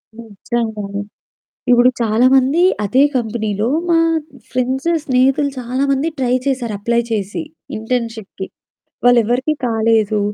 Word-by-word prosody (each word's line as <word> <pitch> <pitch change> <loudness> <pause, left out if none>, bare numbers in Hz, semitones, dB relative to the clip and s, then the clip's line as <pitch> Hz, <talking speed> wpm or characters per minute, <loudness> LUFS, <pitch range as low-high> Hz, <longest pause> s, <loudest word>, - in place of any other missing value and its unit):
నిజంగానే. 215 -2 -4 0.7
ఇప్పుడు 245 +1 +6
చాలామంది 255 +7 +3 0.2
అదే 260 +7 +3
కంపెనీలో 220 -3 -1 0.2
మా 335 - +4 0.5
ఫ్రెండ్సు 260 +5 0
స్నేహితులు 270 +2 +2
చాలామంది 270 +4 0
ట్రై 250 -1 +1
చేశారు. 255 -5 -1
అప్లై 235 +3 +1
చేసి 205 - -2 0.3
ఇంటర్న్‌షిప్‌కి 225 -4 -4 0.6
వాళ్ళే 245 -1 +6
ఎవరికీ 255 +7 0
కాలేదు. 220 -2 +1
240 Hz, 100 wpm, -17 LUFS, 220-260 Hz, 0.7 s, ఇప్పుడు